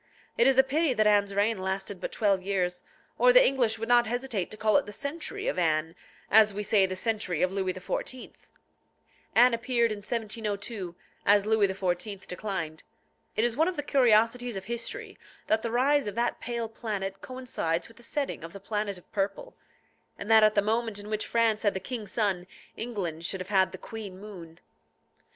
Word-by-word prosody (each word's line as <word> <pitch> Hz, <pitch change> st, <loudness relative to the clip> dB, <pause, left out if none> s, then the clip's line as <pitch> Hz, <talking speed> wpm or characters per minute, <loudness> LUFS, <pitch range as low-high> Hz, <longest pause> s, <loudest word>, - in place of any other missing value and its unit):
It 235 Hz, -, +4 dB
is 270 Hz, -1 st, +4 dB
a 265 Hz, -, +8 dB
pity 285 Hz, 0 st, +1 dB
that 215 Hz, -, +3 dB
Anne's 205 Hz, -1 st, +3 dB
reign 205 Hz, +1 st, +2 dB
lasted 190 Hz, 0 st, -3 dB
but -, -, -4 dB
twelve 200 Hz, -3 st, +1 dB
years, 180 Hz, -2 st, -1 dB, 0.4 s
or -, -, +7 dB
the -, -, +7 dB
English 240 Hz, -5 st, +1 dB
would 225 Hz, +1 st, -4 dB
not 240 Hz, -1 st, +5 dB
hesitate 240 Hz, -5 st, -2 dB
to 215 Hz, -, -7 dB
call 215 Hz, -1 st, +2 dB
it -, -, 0 dB
the -, -, -6 dB
century 325 Hz, -, -5 dB
of -, -, 0 dB
Anne, 160 Hz, -1 st, +1 dB, 0.4 s
as 215 Hz, -1 st, +6 dB
we 210 Hz, -, -2 dB
say 200 Hz, -1 st, +4 dB
the 185 Hz, -, -4 dB
century 205 Hz, -5 st, -1 dB
of 180 Hz, -, +2 dB
Louis 190 Hz, -1 st, -1 dB
XIV. 200 Hz, +7 st, -5 dB, 1.0 s
Anne 245 Hz, +1 st, +7 dB
appeared 235 Hz, 0 st, +1 dB
in 210 Hz, -, -4 dB
1702, 210 Hz, -3 st, -4 dB, 0.3 s
as 205 Hz, 0 st, +4 dB
Louis 215 Hz, -2 st, +3 dB
XIV. 190 Hz, +1 st, -3 dB
declined. 180 Hz, -5 st, -4 dB, 0.5 s
It 220 Hz, -, +1 dB
is 240 Hz, -1 st, +1 dB
one 320 Hz, +4 st, +3 dB
of 370 Hz, -, -1 dB
the 290 Hz, -, -3 dB
curiosities 240 Hz, -2 st, +3 dB
of 190 Hz, -1 st, -6 dB
history, 235 Hz, +2 st, -4 dB, 0.3 s
that 220 Hz, 0 st, +2 dB
the 230 Hz, -, -2 dB
rise 270 Hz, +3 st, +2 dB
of 205 Hz, -, -4 dB
that 235 Hz, +1 st, 0 dB
pale 235 Hz, -1 st, -3 dB
planet 205 Hz, -4 st, -5 dB
coincides 245 Hz, -10 st, -3 dB
with 230 Hz, -, -18 dB
the -, -, -15 dB
setting 280 Hz, -, -3 dB
of 165 Hz, +1 st, -8 dB
the 200 Hz, -, -8 dB
planet 205 Hz, 0 st, -3 dB
of 180 Hz, -, -18 dB
purple, 195 Hz, -1 st, -3 dB, 0.6 s
and 205 Hz, -, -4 dB
that 220 Hz, 0 st, +8 dB
at 215 Hz, 0 st, +5 dB
the 205 Hz, -, +3 dB
moment 225 Hz, 0 st, 0 dB
in 205 Hz, +1 st, -8 dB
which 215 Hz, 0 st, -2 dB
France 230 Hz, -2 st, +2 dB
had 205 Hz, -3 st, +1 dB
the -, -, -1 dB
king 230 Hz, -1 st, -6 dB
Sun, 195 Hz, -4 st, -1 dB, 0.3 s
England 190 Hz, -9 st, -4 dB
should 190 Hz, +2 st, -1 dB
have 185 Hz, +1 st, -7 dB
had 190 Hz, -2 st, +3 dB
the 190 Hz, -, -7 dB
queen 205 Hz, -2 st, -8 dB
Moon. 175 Hz, -6 st, -11 dB
215 Hz, 195 wpm, -28 LUFS, 195-235 Hz, 1.0 s, a